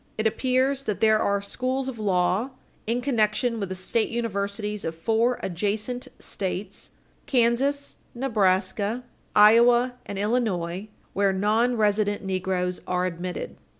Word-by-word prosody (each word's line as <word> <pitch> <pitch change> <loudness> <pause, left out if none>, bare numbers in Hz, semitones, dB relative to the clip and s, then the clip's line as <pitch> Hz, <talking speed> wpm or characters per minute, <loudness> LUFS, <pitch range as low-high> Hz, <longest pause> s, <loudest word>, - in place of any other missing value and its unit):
It 215 - -1
appears 260 +4 +1
that 210 - -2
there 220 -1 +4
are 200 -1 +1
schools 255 +5 -2
of 250 -4 -5
law 190 +3 +1 0.4
in 235 +2 0
connection 230 -2 +1
with 200 -3 -3
the 185 - -4
state 215 +5 -1
universities 210 -2 -3
of 165 - -3
four 225 +8 +1
adjacent 215 +8 -2
States, 195 0 -5 0.4
Kansas, 265 +3 +1 0.2
Nebraska, 210 -1 +1 0.3
Iowa 235 +4 +6
and 200 - -5
Illinois, 200 -4 -1 0.2
where 200 0 +2
nonresident 210 0 +1
negroes 185 -1 -1
are 180 0 0
admitted. 180 0 -5
215 Hz, 120 wpm, -25 LUFS, 195-240 Hz, 0.4 s, Iowa